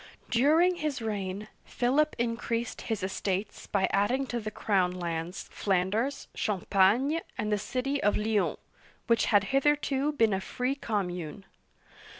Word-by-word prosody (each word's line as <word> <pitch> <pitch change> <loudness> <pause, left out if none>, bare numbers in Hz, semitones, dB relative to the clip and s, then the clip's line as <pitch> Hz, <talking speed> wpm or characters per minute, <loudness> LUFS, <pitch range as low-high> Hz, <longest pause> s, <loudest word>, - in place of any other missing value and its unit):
During 315 +9 +4
his 305 -4 -2
reign, 205 -2 -3 0.2
Philip 280 +5 +1
increased 235 0 -2
his 220 -5 -3
estates 190 +1 -3
by 195 -2 +1
adding 240 +7 +2
to 240 - 0
the 215 -1 -4
crown 190 -4 +1
lands 170 0 -4
Flanders, 205 +8 0
Champagne, 210 - +2 0.2
and 210 0 -1
the 210 - +2
city 265 +6 -2
of 205 - +3
Lyons, 210 -1 +1 0.5
which 230 -1 +3
had 205 -2 +4
hitherto 290 0 +2
been 225 -7 +3
a 190 - 0
free 250 +6 -1
commune. 195 - -3
220 Hz, 135 wpm, -29 LUFS, 195-265 Hz, 0.5 s, During